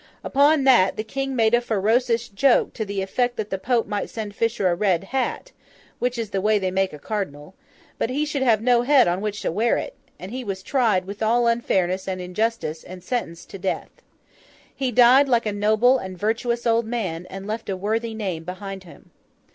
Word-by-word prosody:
Upon 285 +1 +3
that 245 -8 +4
the 215 - -2
King 270 +4 -3
made 225 -1 +2
a 240 - +4
ferocious 230 +2 +1
joke 245 +4 +2
to 220 - -3
the 200 -1 -3
effect 245 +5 -1
that 210 -1 -4
the 190 - -2
Pope 235 +2 +1
might 205 0 -3
send 215 -2 -6
Fisher 225 -2 0
a 175 - +2
red 185 -2 +1
hat—which 250 - -5
is 225 -3 -4
the 195 - -1
way 215 +1 +3
they 190 -2 -1
make 190 0 0
a 150 - -9
cardinal—but 185 +3 -6
he 290 +4 0
should 295 -2 -3
have 225 -4 +3
no 245 -1 +4
head 265 -1 +5
on 175 +2 0
which 210 -1 -4
to - - 0
wear 225 +7 +1
it; - - -5 0.2
and 185 +3 -9
he 255 +1 -5
was 195 -3 -5
tried 220 -9 +1
with 200 +2 -8
all 235 +2 +2
unfairness 190 -6 0
and 185 -1 -3
injustice, 180 -2 -2
and 180 0 -11
sentenced 180 -7 -4
to 195 - -8
death. 190 - -3 0.8
He 265 -2 -1
died 250 +4 +6
like 235 -2 +2
a 210 - -1
noble 220 +5 +3
and 190 -3 -7
virtuous 230 +4 -1
old 230 -1 +2
man, 185 -8 -3
and 195 +1 -8
left 220 +1 -5
a 190 - -2
worthy 220 +3 -2
name 185 -7 -4
behind 190 +2 -7
him. 170 - -16
215 Hz, 205 wpm, -23 LUFS, 190-240 Hz, 0.8 s, died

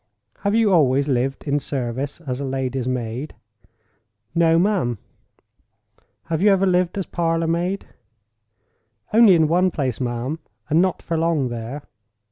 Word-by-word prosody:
Have 200 +1 0
you 220 -4 +3
always 140 -4 +3
lived 135 0 -1
in 145 0 0
service 135 +2 -4
as 130 -4 -4
lady's 130 -2 -2
maid?" 125 +3 -3 1.0
"No, 165 -1 +4
ma'am." 175 - +1 1.3
"Have 165 -1 -2
you 210 - +5
ever 195 0 +3
lived 180 0 +1
as 195 - -2
parlor 165 -1 -1
maid?" 175 +4 -1 1.3
"Only 220 -4 +7
in 160 -2 +3
one 180 +4 +3
place, 135 -7 -3
ma'am, 125 +5 -3 0.3
and 160 +3 +5
not 185 -1 0
for 165 -1 -2
long 160 -6 +1
there." 120 +5 -6
155 Hz, 135 wpm, -22 LUFS, 130-175 Hz, 1.3 s, Only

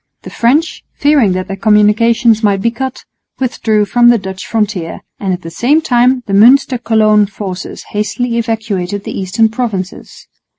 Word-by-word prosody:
The - - -9
French, 285 +8 0
fearing 285 -10 +2
that 185 0 -4
their 195 - -5
communications 220 +3 +3
might 200 -3 +1
be 230 +4 0
cut, 260 +2 -6 0.3
withdrew 220 -4 0
from 240 +4 +3
the 240 - +4
Dutch 190 -2 -7
frontier; 210 -7 -3 0.2
and 195 -2 -2
at 180 0 -4
the 165 - -8
same 275 - +2
time 250 -3 +1
the 195 - -5
Münster 250 +4 +4
Cologne 215 -2 +3
forces 195 -2 -7
hastily 230 +3 -2
evacuated 205 -4 -3
the - - -6
eastern 195 +4 +1
provinces. 220 -5 -5
220 Hz, 160 wpm, -13 LUFS, 195-240 Hz, 0.3 s, the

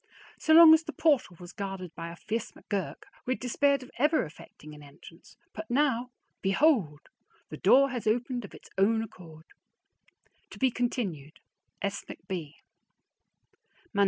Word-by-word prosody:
So 315 - +3
long 330 -1 +10
as 320 - +5
the - - -7
portal 290 - +1
was 175 -1 -11
guarded 195 -4 -6
by 165 0 -7
a - - -9
fierce 220 +5 -4
McGurk, 200 -4 -5 0.2
we 255 - +1
had - - -15
despaired 275 +2 +1
of 250 - -14
ever 300 - +3
effecting 155 0 -13
an 150 - -12
entrance; 145 +4 -16 0.2
but 325 - -8
now, 250 -2 +1 0.3
behold! 195 - +2 0.5
The - - -7
door 275 0 +5
has 245 -3 -4
opened 245 +2 0
of 200 - -11
its - - -16
own 220 +3 +3
accord. 165 -7 -13 1.0
To - - -12
be 260 -1 +2
continued. 195 - -3 0.5
S. 200 0 -2
McB. 165 -5 -7
220 Hz, 150 wpm, -28 LUFS, 170-260 Hz, 1.0 s, long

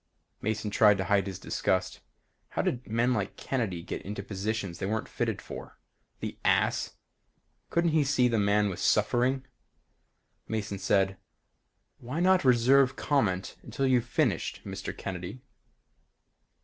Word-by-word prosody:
Mason 110 0 -2
tried 105 -1 +5
to 95 - -1
hide 100 0 +2
his 95 -2 -5
disgust. 95 -1 -1 0.5
How - - -1
did 125 0 -2
men 115 +3 +2
like 105 -4 -2
Kennedy 105 -10 -2
get - - -5
into 100 0 -6
positions 100 -2 -3
they 95 - -2
weren't 110 +1 -2
fitted - - -2
for? - - -9 0.4
The - - -5
ass! - - +2 0.7
Couldn't 170 -1 +2
he 155 -1 +3
see 135 -3 +3
this 115 -2 +1
man 105 +1 +3
was 95 -3 -4
suffering? 125 +5 +2 1.0
Mason 105 -3 -3
said, 95 0 +2 0.8
"Why 130 +7 -4
not 185 +1 +4
reserve 130 +1 +5
comment 100 -13 0
until 135 - -2
you've 125 -3 +3
finished, - - 0
Mr. 95 0 -5
Kennedy?" 95 +6 -6
110 Hz, 135 wpm, -29 LUFS, 100-130 Hz, 1.0 s, tried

